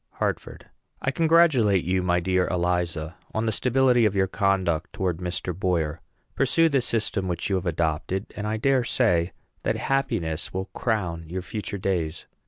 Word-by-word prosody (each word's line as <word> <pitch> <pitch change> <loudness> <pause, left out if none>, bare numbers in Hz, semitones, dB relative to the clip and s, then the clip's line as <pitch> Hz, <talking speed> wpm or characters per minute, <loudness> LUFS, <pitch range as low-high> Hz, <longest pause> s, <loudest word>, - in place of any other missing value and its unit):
HARTFORD. - - -3 0.4
I 135 - +1
congratulate 155 - +4
you, 90 +2 +1
my 90 -1 +2
dear 90 +1 +1
Eliza, 90 -2 -1 0.2
on 110 +1 0
the 110 - +1
stability 125 +1 +3
of 105 -2 +2
your 95 -1 +3
conduct 95 -4 0
towards 90 -2 -2
Mr. 90 0 -3
Boyer. 85 -4 -1 0.3
Pursue 165 +5 +3
the 140 -3 +2
system 110 -5 -1
which 90 +2 -2
you - - +3
have 90 0 -4
adopted, 85 +4 -1
and 105 0 -3
I 110 +1 -1
dare 130 +2 +2
say 85 -6 +2 0.3
that - - 0
happiness 85 - -1
will 95 +1 -4
crown 90 -8 -1
your 90 +1 -4
future 105 0 -5
days. 90 -4 -2
95 Hz, 165 wpm, -25 LUFS, 85-110 Hz, 0.4 s, congratulate